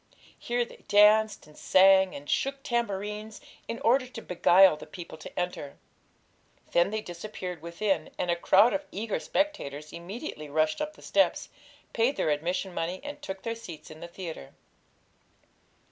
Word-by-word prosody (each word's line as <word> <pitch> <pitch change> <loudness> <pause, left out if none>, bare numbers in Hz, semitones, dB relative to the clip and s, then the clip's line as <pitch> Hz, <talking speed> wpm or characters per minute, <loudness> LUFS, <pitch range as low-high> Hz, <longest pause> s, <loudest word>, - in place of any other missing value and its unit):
Here 240 0 -1
they - - -16
danced, 210 +1 +5
and 150 0 -18
sang, 190 0 +5
and 145 +1 -9
shook 275 - -1
tambourines, 210 -2 -3 0.3
in 230 - -4
order 255 +1 +3
to 245 -2 -9
beguile 180 0 +5
the 150 - -11
people 170 +1 -9
to - - -7
enter. 180 -5 -4 0.9
Then 175 +2 +3
they 215 +1 -2
disappeared 180 -1 -7
within, 170 0 -1
and 180 -1 0
a - - +2
crowd 200 +6 +5
of 295 0 -3
eager 215 +1 -2
spectators 155 - -2
immediately 175 - -7
rushed 155 +1 +1
up 305 0 -3
the - - -16
steps, - - +1 0.4
paid 240 +5 +2
their 155 - +1
admission 175 +5 -2
money, 175 +2 -3
and 290 0 -7
took 190 0 -7
their 230 - -2
seats 170 -11 -10
in 155 - -11
the 170 - -7
theatre. 170 - -8
190 Hz, 160 wpm, -28 LUFS, 170-225 Hz, 0.9 s, danced